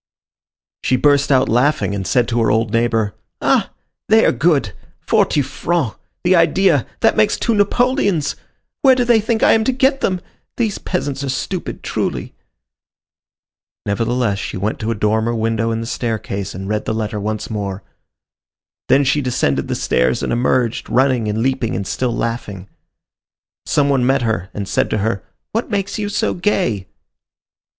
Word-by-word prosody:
She 130 - +2
burst 145 +2 +3
out 130 -1 +4
laughing, 125 -1 +2
and 95 -2 -3
said 125 +4 +2
to 120 -1 +1
her 115 - +2
old 110 0 +1
neighbor: 115 -3 +1 0.3
"Ah! - - +2 0.4
they 220 +1 +5
are - - +5
good! 135 - +1 0.3
Forty 145 - +2
francs! 145 -1 -2 0.3
the 180 +1 +4
idea! 165 -4 +3
That 225 - +4
makes 215 -1 +3
two 235 - 0
napoleons! 205 - +1 0.5
Where 265 -3 +6
do 250 -1 +1
they 235 -2 +4
think 220 +1 0
I - - +6
am 220 - +4
to 260 - +3
get 265 +2 +1
them? 185 -1 0 0.4
These 225 -4 -1
peasants 140 -6 -3
are 140 - -3
stupid, 175 +7 -4
truly." - - -3 1.5
Nevertheless 115 0 0
she - - -5
went 105 +4 -2
to 110 - -3
a 115 - 0
dormer 110 +3 0
window 115 0 0
in 115 0 -2
the - - -4
staircase 110 -5 -3
and 95 +1 -6
read 105 +1 -2
the 110 - -1
letter 105 -1 -3
once 110 +2 -4
more. 100 -3 -4 1.1
Then 140 - +5
she 140 +2 +1
descended 125 - 0
the - - -2
stairs 60 +1 +1
and - - -1
emerged, 120 -1 0
running 130 -3 +2
and 105 +2 -1
leaping 130 -3 0
and 95 - -3
still 125 +5 -1
laughing. 105 -6 -4 1.0
Some 145 -1 +2
one 135 -3 +2
met 135 +1 +2
her 110 -5 -1
and 100 -1 -5
said - - 0
to - - 0
her, 100 -2 -1 0.3
"What 225 +2 -2
makes 200 0 -2
you 205 -1 -2
so 205 - 0
gay?" 170 - 0
125 Hz, 170 wpm, -18 LUFS, 110-175 Hz, 1.5 s, Where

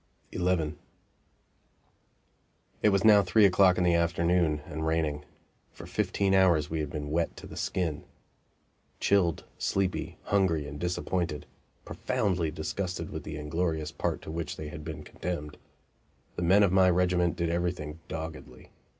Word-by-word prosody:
XI 90 -4 +1 2.1
It 105 - +5
was 100 0 +2
now 105 -2 +8
three 100 +3 +4
o'clock 95 -1 +5
in 90 - +2
the 90 -1 +3
afternoon, 85 -2 +2
and 80 +1 -5
raining. 80 -2 0 0.5
For - - -10
fifteen 100 -1 0
hours 85 -6 +4
we 80 - -1
had 75 -2 -2
been 75 -1 -5
wet 85 +1 -1
to - - -9
the - - -10
skin. 85 -5 -2 1.0
Chilled, 90 -5 +2 0.2
sleepy, 95 -2 -1
hungry 90 -7 +1
and 75 0 -7
disappointed 85 -2 -2 0.4
profoundly 90 -6 -1
disgusted 85 +2 -4
with 80 - -5
the 75 - -6
inglorious 80 +1 -2
part 75 - -3
to - - -7
which 85 0 -4
they 75 - -6
had 75 0 -8
been 80 0 -6
condemned 75 -4 -5 0.8
the - - -4
men 95 +4 +5
of 100 - +3
my 95 -1 +5
regiment 90 -1 +2
did 85 -1 -1
everything 85 -3 -2
doggedly. 80 -6 -8
85 Hz, 145 wpm, -29 LUFS, 80-90 Hz, 2.1 s, now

